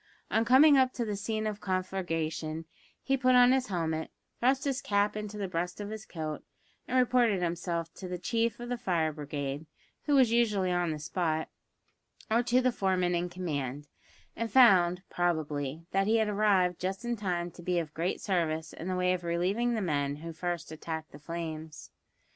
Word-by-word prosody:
On 225 - +3
coming 275 +4 +7
up 255 -1 +3
to 235 - -2
the 210 -2 -2
scene 215 +2 -2
of 210 -1 -3
conflagration, 165 -4 -2 0.4
he 270 - +2
put 255 -1 +3
on 245 0 +7
his 260 -1 +2
helmet, 160 -4 -2 0.3
thrust 265 +2 +2
his 275 -2 -1
cap 205 0 +1
into 210 0 -5
the 200 -2 -2
breast 180 +1 -3
of 205 0 -5
his 220 0 -7
coat, 155 -3 -5 0.4
and 255 - 0
reported 240 -6 +3
himself 170 -1 -2
to 185 - -8
the 180 0 -4
chief 230 +5 -1
of 240 0 -6
the 245 -1 -2
fire 170 -8 0
brigade 145 0 -4 0.4
(who 290 - +3
was 255 -4 +5
usually 210 -6 +2
on 175 -1 +1
the 155 - -2
spot), 160 0 -1 0.8
or 230 +2 +4
to 245 +1 +2
the 255 0 +2
foreman 185 -5 +1
in 175 +1 -1
command, 145 -6 -4 0.5
and 230 0 -3
found, 180 -8 +6
probably, 155 -3 -1
that 195 +1 +1
he 225 +1 +4
had 220 -1 +2
arrived 200 -4 +2
just 190 +5 -3
in 240 0 0
time 175 -5 -2
to 175 - -13
be 180 +1 0
of 160 -3 -2
great 170 +3 -1
service 160 -4 -1
in 165 - -7
the 185 - -1
way 180 0 +2
of 180 -1 -3
relieving 190 +8 0
the 220 - -1
men 145 -5 0
who 165 +3 -7
first 175 0 -4
attacked 160 0 -6
the 145 - -12
flames. 160 -1 -6
180 Hz, 190 wpm, -30 LUFS, 165-220 Hz, 0.8 s, coming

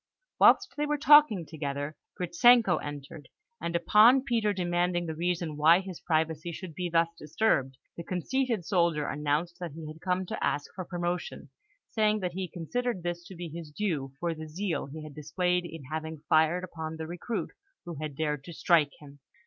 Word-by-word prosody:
Whilst 395 - +5
they 295 0 -1
were 295 0 0
talking 285 - +6
together, 145 -1 -4 0.2
Gritzenko 185 +2 +5
entered, 145 +1 -8 0.3
and 170 - -3
upon 215 +9 +6
Peter 230 -5 +1
demanding 175 -2 0
the 160 - -3
reason 170 -1 -2
why 160 +4 +6
his 190 -3 -7
privacy 160 0 -1
should 170 0 -8
be 180 +2 -3
thus 165 0 +3
disturbed, 145 -5 0 0.2
the 170 - -6
conceited 225 +3 -1
soldier 170 -6 +1
announced 150 +4 -1
that 175 -5 -6
he 160 0 -8
had 155 +1 -9
come 185 0 0
to - - -5
ask 145 - -1
for 185 - -6
promotion, 175 0 -4 0.4
saying 215 -1 +1
that 180 -1 -2
he 185 0 -3
considered 190 +4 -3
this 175 0 -3
to 190 - -10
be 175 0 -6
his 165 0 -8
due 150 -6 -2
for 170 -1 -1
the 155 0 -8
zeal 180 0 -2
he 155 +2 -8
had 155 -1 -9
displayed 180 +4 -1
in 165 -3 -8
having 160 -1 -5
fired 160 +3 +3
upon 160 -3 -6
the 160 - -5
recruit 175 +7 -4 0.3
who 175 - -6
had 150 -2 -5
dared 150 -2 -2
to 170 - -8
strike 155 -3 +3
him. 145 -1 -14
170 Hz, 180 wpm, -29 LUFS, 155-185 Hz, 0.4 s, talking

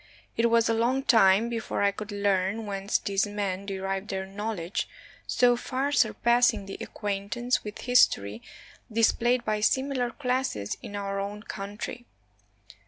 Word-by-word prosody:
It 235 0 +3
was 230 0 +4
a 230 - +2
long 245 +4 +1
time 220 -3 +5
before 230 -3 -2
I 200 - +4
could 210 +1 -7
learn 200 +1 0
whence 200 0 -1
these 195 0 0
men 200 -2 -3
derived 195 0 -3
their 190 -1 -3
knowledge, 195 -2 -4 0.4
so 245 -1 +4
far 265 +3 -2
surpassing 235 -4 +3
the 195 - -8
acquaint 200 -1 -4
ance 245 +1 0
with 210 -1 -7
history 110 - +3 0.5
displayed 240 +2 +2
by 215 -1 0
similar 260 +2 +1
classes 250 - -2
in 205 - -8
our 200 -1 -3
own 205 +1 -5
country. 210 +4 -6
210 Hz, 145 wpm, -27 LUFS, 195-240 Hz, 0.5 s, time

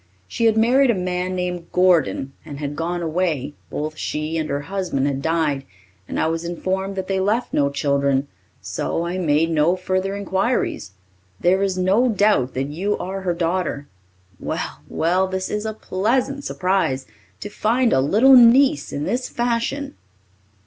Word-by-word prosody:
She 230 - -1
had 220 -1 +4
married 250 +4 +4
a 235 - +3
man 180 0 -2
named 180 -1 -4
Gordon 170 -7 +2
and 145 -2 -8
had 145 0 -4
gone 170 +2 -2
away, 160 -4 -1 0.2
both 155 +1 -4
she 155 +1 -3
and 155 -1 -2
her 140 0 -1
husband 180 -5 -2
had 140 -1 -1
died, 155 -3 0 0.4
and - - -3
I - - +2
was 165 +1 -1
informed 190 +3 -3
that 190 -1 -4
they 195 -1 0
left 215 +6 0
no 140 -1 +2
children, 140 -1 0 0.4
so 170 - -2
I 180 +2 -3
made 165 -1 +2
no 160 +3 +3
further 185 +1 -2
inquiries. 195 - -1 0.5
There 185 +2 +3
is 195 -2 0
no 195 +7 +3
doubt 205 - +2
that 135 +2 -2
you 190 +8 -1
are 195 +1 -5
her 180 -2 0
daughter. 170 -4 -1 0.5
Well, - - -4
well, 180 +3 +1
this 190 0 -3
is 210 +1 -2
a 220 - -3
pleasant 250 +9 -1
surprise, 175 -8 0 0.3
to 205 - -6
find 230 +4 +1
a 130 - +4
little 220 - +6
niece 245 - +5
in 145 - -3
this 250 +9 -2
fashion!" 245 +4 -2
180 Hz, 165 wpm, -21 LUFS, 155-205 Hz, 0.5 s, little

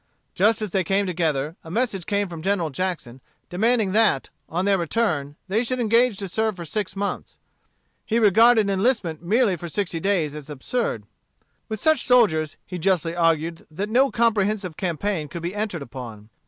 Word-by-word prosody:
Just 215 +3 +2
as 210 - -4
they 190 0 +1
came 195 +4 +1
together, 160 -4 -1
a 160 - -10
message 205 -2 -1
came 205 -1 0
from 170 -3 -8
General 180 -3 0
Jackson, 135 -6 -4 0.3
demanding 220 +2 +1
that, 210 -10 +2 0.2
on 180 +4 -1
their 200 -1 +3
return, 160 -6 -1
they 210 +5 +1
should 255 +1 -2
engage 230 -1 +3
to 195 - -4
serve 220 +3 -1
for 175 -2 -7
six 200 +5 -3
months. 200 0 -4 0.7
He 225 - 0
regarded 220 +1 +5
enlistment 195 -5 0
merely 205 +3 +2
for 170 0 -7
sixty 175 -2 -2
days 170 -5 0
as 150 -1 -8
absurd. 150 - -2 0.7
With 220 -1 -3
such 315 -1 +3
soldiers, 170 - +3
he 180 - -6
justly 170 -2 +1
argued 165 -1 0
that 190 +7 -4
no 260 +5 +4
comprehensive 210 -6 +1
campaign 175 -1 -2
could 170 +2 -7
be 175 +2 -3
entered 205 -7 -3
upon. 115 -5 -9
190 Hz, 170 wpm, -23 LUFS, 165-220 Hz, 0.7 s, regarded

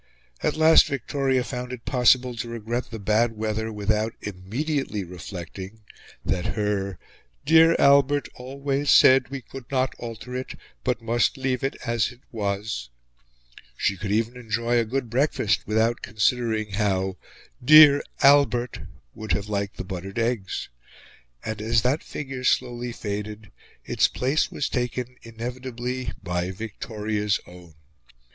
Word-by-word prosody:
At - - 0
last 160 +1 +7
Victoria 135 -1 0
found 125 -1 -5
it 125 -3 -8
possible 125 -1 +3
to 120 - -4
regret 115 +1 -4
the 115 - -6
bad 110 +3 +1
weather 110 +1 -2
without 105 +1 -1
immediately 105 - -3
reflecting 90 +3 -8 0.4
that 90 -2 -1
her 100 -3 -1 0.5
"dear 165 +1 +6
Albert 140 0 +4
always 140 +2 -3
said 130 0 +6
we 135 -1 -5
could 135 -3 -11
not 130 -1 0
alter 120 +1 -7
it, 130 +1 -5 0.3
but 125 -2 -1
must 120 +4 +1
leave 130 -1 -1
it 135 - -1
as 115 -3 0
it 125 0 -17
was;" 100 - -3 0.9
she 100 - +1
could 100 +2 -5
even 115 +3 0
enjoy 115 0 0
a 115 - +1
good 125 +2 -2
breakfast 125 -2 +1
without 110 +2 +1
considering 110 0 0
how 95 -2 0 0.5
"dear 150 +1 +9 0.2
Albert" 135 -4 +4 0.3
would 110 0 -3
have 100 +1 -2
liked 100 -1 -2
the - - -4
buttered 95 +1 -7
eggs. 115 -5 -2 0.8
And, 110 -1 -4
as 110 0 +2
that 135 +5 +1
figure 135 -3 -6
slowly 125 -1 0
faded, 105 -1 -6 0.3
its - - +3
place 135 +4 0
was 145 - -2
taken, 125 0 -3
inevitably, 125 +2 -5
by 90 -1 -2
Victoria's 105 0 -2
own. 90 -3 -14
115 Hz, 135 wpm, -25 LUFS, 105-130 Hz, 0.9 s, dear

